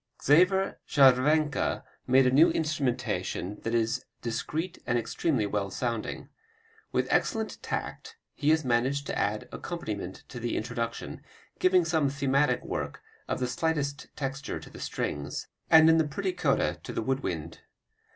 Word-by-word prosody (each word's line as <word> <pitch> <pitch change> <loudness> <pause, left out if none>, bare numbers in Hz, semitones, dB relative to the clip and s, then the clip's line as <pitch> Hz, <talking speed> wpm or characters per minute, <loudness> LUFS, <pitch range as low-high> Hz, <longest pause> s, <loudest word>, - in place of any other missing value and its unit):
Xaver 185 +6 +4
Scharwenka 140 +2 +3 0.2
made 130 +1 +5
a 125 - +4
new 150 +6 +6
instrumentation 135 - -1
that 115 +1 -1
is 115 +2 0 0.2
discreet 160 +9 -3
and 120 0 +2
extremely 120 0 0
well 100 -1 -1
sounding. 115 +2 -3 0.6
With - - +1
excellent 220 -1 0
tact 450 +1 -5 0.2
he 150 - 0
has 160 -2 +3
managed 130 +4 +1
the - - -3
added 105 +1 -1
accompaniment 105 - -5
to 125 - -7
the 120 0 -2
introduction, 115 +1 -4 0.4
giving 185 -2 +4
some 160 -4 +2
thematic 140 +1 +1
work - - -4 0.2
of - - -2
the 125 - 0
slightest 150 0 -1
texture 135 -1 -4
to - - -13
the - - -11
strings, 70 0 -3 0.2
and 160 0 +8
in 160 0 +6
the 160 - +2
pretty 185 +6 -2
coda 180 - +1
to - - -7
the - - -2
wood 135 +3 0
wind. 85 - -4
135 Hz, 150 wpm, -28 LUFS, 115-160 Hz, 0.6 s, and